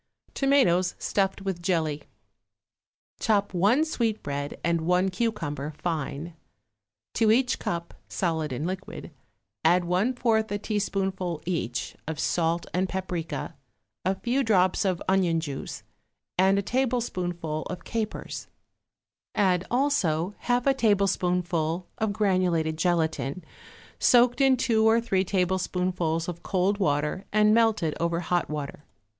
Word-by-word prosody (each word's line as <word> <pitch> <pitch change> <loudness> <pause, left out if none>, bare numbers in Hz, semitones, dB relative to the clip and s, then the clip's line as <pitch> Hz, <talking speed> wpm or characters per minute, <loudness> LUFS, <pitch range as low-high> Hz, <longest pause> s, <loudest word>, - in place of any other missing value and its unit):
=Tomatoes 250 -11 +3
Stuffed 195 -1 -1
with 190 -3 -3
Jelly.= 160 -5 0 1.2
Chop 205 -3 +1
one 210 - +3
sweetbread 205 - -2
and 170 0 +1
one 180 +3 +2
cucumber 180 -9 -2
fine. 165 -1 -3 0.8
To 220 -1 +3
each 250 +2 +2
cup 170 0 -3 0.2
(solid 160 -5 -1
and 130 +5 -3
liquid) 185 +2 -6 0.5
add 175 0 +4
one 185 +9 +1
fourth 220 -3 +1
a 205 - 0
teaspoonful, 195 -5 -2
each, 160 -9 -2
of 160 -1 -4
salt 170 0 0
and 185 +1 0
paprica, 180 -4 -4 0.5
a 190 +2 +1
few 250 +7 0
drops 190 -3 +3
of 185 -3 0
onion 185 -4 +2
juice 145 -4 -6 0.5
and 190 +2 +4
a 200 - 0
tablespoonful 185 -11 -1
of 180 - -6
capers; 220 -2 -4 0.9
add 185 -3 +2
also 205 - +1
half 245 0 0
a 275 - +5
tablespoonful 180 -6 +1
of 220 -1 +1
granulated 185 -6 +1
gelatine, 160 -3 0 0.6
soaked 245 +1 +5
in 265 -1 +5
two 225 -3 +2
or 220 +1 +5
three 195 -5 +1
tablespoonfuls 180 -3 0
of 175 -1 -5
cold 195 +2 0
water 150 +1 0
and 210 0 +4
melted 220 -9 +3
over 170 0 0
hot 175 0 0
water. 150 -1 -5
185 Hz, 125 wpm, -26 LUFS, 165-215 Hz, 1.2 s, a